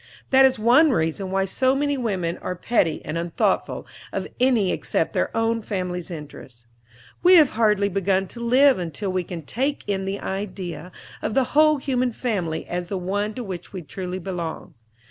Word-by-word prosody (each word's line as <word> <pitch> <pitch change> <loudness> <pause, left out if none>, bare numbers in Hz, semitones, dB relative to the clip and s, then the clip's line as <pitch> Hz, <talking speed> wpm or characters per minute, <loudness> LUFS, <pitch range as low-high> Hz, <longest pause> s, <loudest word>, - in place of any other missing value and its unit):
That 265 0 +7
is 260 -1 +3
one 245 +9 +5
reason 185 - 0
why 195 0 +1
so 260 +7 +1
many 285 +1 0
women 190 -9 -2
are 180 - -4
petty 180 -3 0
and 165 - -3
unthoughtful 170 0 -1 0.3
of - - -3
any 245 -7 +3
except - - -1
their - - +1
own 225 0 +1
family's 180 -4 -4
interests. 140 -7 -10 0.6
We 360 +1 +7
have 310 -6 +6
hardly 210 -3 +2
begun 195 0 +1
to 235 - -9
live 255 +1 +4
until 180 +3 -3
we 185 -1 -1
can 170 -2 -7
take 270 - -2
in 195 -2 -2
the 195 +1 -3
idea 185 -4 -5 0.3
of 210 - -2
the 270 - +4
whole 305 0 +5
human 255 -3 -1
family 190 -10 -2
as 175 0 -4
the 195 - -3
one 205 +4 -2
to 250 - -4
which 185 -4 -7
we 185 -3 -6
truly 180 +3 -5
belong. 175 -3 -5
195 Hz, 180 wpm, -23 LUFS, 180-245 Hz, 0.6 s, That